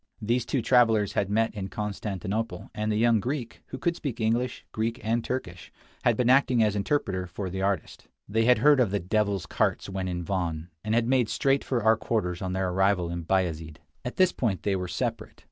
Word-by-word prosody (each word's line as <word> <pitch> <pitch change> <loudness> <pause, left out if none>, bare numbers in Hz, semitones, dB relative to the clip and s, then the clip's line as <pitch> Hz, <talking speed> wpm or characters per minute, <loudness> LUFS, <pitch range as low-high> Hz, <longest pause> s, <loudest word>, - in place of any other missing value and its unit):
These 120 +3 0
two 130 -5 0
travelers 115 -5 +4
had 100 - 0
met 110 +2 +1
in 100 -3 -4
Constantinople, 105 0 -4
and 110 0 -1
the 105 - +1
young 115 0 +4
Greek, 125 +1 -4
who - - -7
could 170 0 0
speak 130 -8 -5
English, 120 +3 -1
Greek, 115 +2 -2
and 115 +1 0
Turkish, 90 -10 -5 0.3
had 120 -3 +3
been 125 - +1
acting 130 -2 +4
as 105 -1 +1
interpreter 100 -5 -1
for 95 +1 -5
the 95 +1 -3
artist. 95 -4 -2 0.2
They 110 +2 +1
had 125 +1 +5
heard 145 +4 +5
of 120 -5 +3
the 100 +1 0
"devil's 100 +1 0
carts" - - -1
when 95 -1 -3
in 90 -1 -3
Van, 85 -3 -3
and 110 +1 0
had 115 0 +2
made 125 -3 +2
straight 135 +3 +1
for 120 -4 -1
our 110 0 +5
quarters 90 -6 -2
on 95 -1 -2
their 95 0 0
arrival 95 -1 +1
in 85 -1 -5
Bayazid. 80 -4 -1 0.3
At 125 - -5
this 185 -1 +4
point 100 -9 -2
they 100 -1 +1
were 90 -1 -3
to - - -7
separate. - - -3
105 Hz, 215 wpm, -27 LUFS, 95-120 Hz, 0.3 s, had